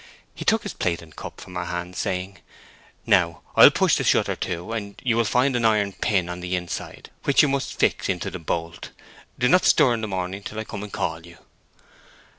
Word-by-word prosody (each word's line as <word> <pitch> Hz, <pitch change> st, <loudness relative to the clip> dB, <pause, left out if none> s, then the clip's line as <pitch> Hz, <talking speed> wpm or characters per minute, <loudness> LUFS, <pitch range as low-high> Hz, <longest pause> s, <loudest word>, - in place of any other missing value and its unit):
He -, -, -8 dB
took 220 Hz, 0 st, +3 dB
his 205 Hz, -, -5 dB
plate 85 Hz, -2 st, -2 dB
and 80 Hz, -, -17 dB
cup -, -, -9 dB
from 90 Hz, -, -11 dB
her 90 Hz, -1 st, -3 dB
hands, 90 Hz, +1 st, -5 dB
saying, 90 Hz, 0 st, -3 dB, 0.7 s
"Now 85 Hz, -2 st, +2 dB
I'll -, -, +10 dB
push -, -, +2 dB
the -, -, -1 dB
shutter -, -, +2 dB
to, 85 Hz, +5 st, -4 dB
and 100 Hz, -3 st, -5 dB
you 120 Hz, -3 st, +2 dB
will 115 Hz, 0 st, +2 dB
find 125 Hz, +5 st, +2 dB
an 120 Hz, -, 0 dB
iron 105 Hz, -3 st, +2 dB
pin 95 Hz, -5 st, 0 dB
on 90 Hz, 0 st, -5 dB
the 90 Hz, +1 st, -2 dB
inside, 90 Hz, -1 st, -6 dB
which 140 Hz, -, +5 dB
you -, -, +4 dB
must 140 Hz, -1 st, -2 dB
fix -, -, +1 dB
into 90 Hz, -2 st, -2 dB
the 95 Hz, -, -6 dB
bolt. 85 Hz, +1 st, -4 dB, 0.5 s
Do 125 Hz, -, +2 dB
not 180 Hz, +8 st, +4 dB
stir 135 Hz, -6 st, +5 dB
in 115 Hz, -, -2 dB
the 110 Hz, -, -3 dB
morning 95 Hz, 0 st, -4 dB
till 110 Hz, -, -8 dB
I 110 Hz, -, -2 dB
come 105 Hz, -2 st, -7 dB
and 105 Hz, -1 st, -7 dB
call 80 Hz, 0 st, -3 dB
you." 85 Hz, 0 st, -14 dB
95 Hz, 220 wpm, -24 LUFS, 90-115 Hz, 0.7 s, I'll